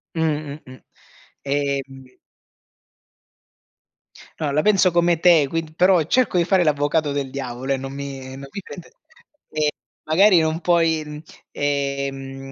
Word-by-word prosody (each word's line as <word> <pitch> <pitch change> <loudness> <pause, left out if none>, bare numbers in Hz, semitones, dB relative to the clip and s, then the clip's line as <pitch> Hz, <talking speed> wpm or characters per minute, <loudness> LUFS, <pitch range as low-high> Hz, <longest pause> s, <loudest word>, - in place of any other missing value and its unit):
Mh-mh, 155 -2 -2
mh. 130 0 -13 0.6
Ehm 135 -2 -3 2.2
No, 150 -3 -1
la 150 +2 +2
penso 195 -3 +4
come 170 0 +2
te, 165 -4 +5
quind 160 +1 -4
però, 180 -1 +4
cerco 245 - +1
di 175 - +4
fare 180 0 +2
l'avvocato 145 0 +1
del 140 -2 -2
diavolo, 130 -1 -5
ehm, 135 - 0
non 135 +1 -7
mi 135 -1 -7
non 135 +1 -9
mi 200 - -6
prende 180 -2 -11 0.6
ehm, 155 -1 +1 0.4
magari 185 +3 +6
non 160 +1 -1
puoi 160 -3 0 0.3
ehm, 140 -1 -3
150 Hz, 130 wpm, -21 LUFS, 135-165 Hz, 2.2 s, magari